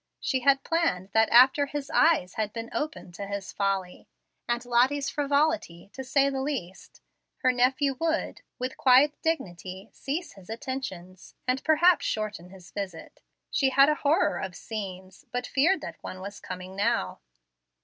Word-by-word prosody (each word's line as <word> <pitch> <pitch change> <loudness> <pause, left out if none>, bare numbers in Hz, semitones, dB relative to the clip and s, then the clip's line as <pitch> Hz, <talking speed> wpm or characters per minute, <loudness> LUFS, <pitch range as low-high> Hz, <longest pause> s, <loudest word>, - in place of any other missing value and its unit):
She 260 - 0
had 270 +1 +3
planned 265 - 0
that 220 +1 +3
after 265 +4 +6
his 285 -1 -5
"eyes 310 - +3
had 215 -1 -2
been 230 0 -6
opened 300 - -4
to 200 +3 -6
his 200 -1 -5
folly," 195 -2 -2 0.4
and 240 0 -1
Lottie's 255 +4 +2
frivolity, 285 - 0
to 265 - -6
say 275 +1 +2
the 270 -1 -2
least, 260 -11 -5 0.4
her 255 - +5
nephew 260 +2 +1
would, 325 0 -1 0.2
with 255 0 -4
quiet 270 +3 +5
dignity, 190 - -3
cease 310 +6 -4
his 195 0 -16
attentions, 200 -7 -6
and 255 +1 0
perhaps 335 +3 +4
shorten 210 -5 -3
his 185 -2 -14
visit. 195 -5 -7 0.3
She 270 -3 +2
had 275 +2 +6
a - - +4
horror 300 +6 +2
of 185 -1 -5
scenes, 190 -3 -7
but 245 0 -2
feared 320 +10 +2
that - - -8
one 185 - -7
was 200 +2 -8
coming 185 0 -8
now. 200 - 0
245 Hz, 160 wpm, -27 LUFS, 190-280 Hz, 0.4 s, after